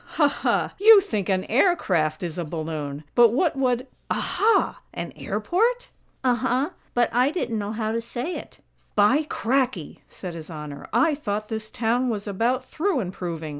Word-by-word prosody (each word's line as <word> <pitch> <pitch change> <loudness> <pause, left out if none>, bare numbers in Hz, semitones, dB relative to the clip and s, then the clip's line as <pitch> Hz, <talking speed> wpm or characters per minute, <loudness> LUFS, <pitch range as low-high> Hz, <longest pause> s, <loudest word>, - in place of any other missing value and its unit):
Ha, 295 - +6
ha! - - 0
You 430 +1 +9
think 215 - -3
an 185 -1 +1
air 315 - +3
craft 155 - 0
is 170 0 -4
a - - -1
balloon! 155 -2 -5
But 240 -1 +7
what 305 +4 +2
would 255 -2 +1 0.2
Aha! 445 +2 +1
An - - -5
airport?" 480 +7 0 0.3
"Uh 255 -1 +4
huh; 255 +4 0 0.3
but 240 -2 +2
I 250 +3 +4
didn't 245 -9 -2
know 205 0 -3
how 220 -1 -2
to 230 +1 -1
say 245 +8 -4
it." - - -9 0.3
"By 260 +9 +4
cracky!" 250 - -1
said 180 -3 -8
His 165 0 -9
Honor. 150 -3 -8
"I 325 -1 +3
thought 210 -7 -3
this 220 -1 -4
town 240 +3 0
was 210 -2 -3
about 235 +6 0
through 330 +1 -1
improving. 175 -5 -4
230 Hz, 170 wpm, -24 LUFS, 185-275 Hz, 0.3 s, You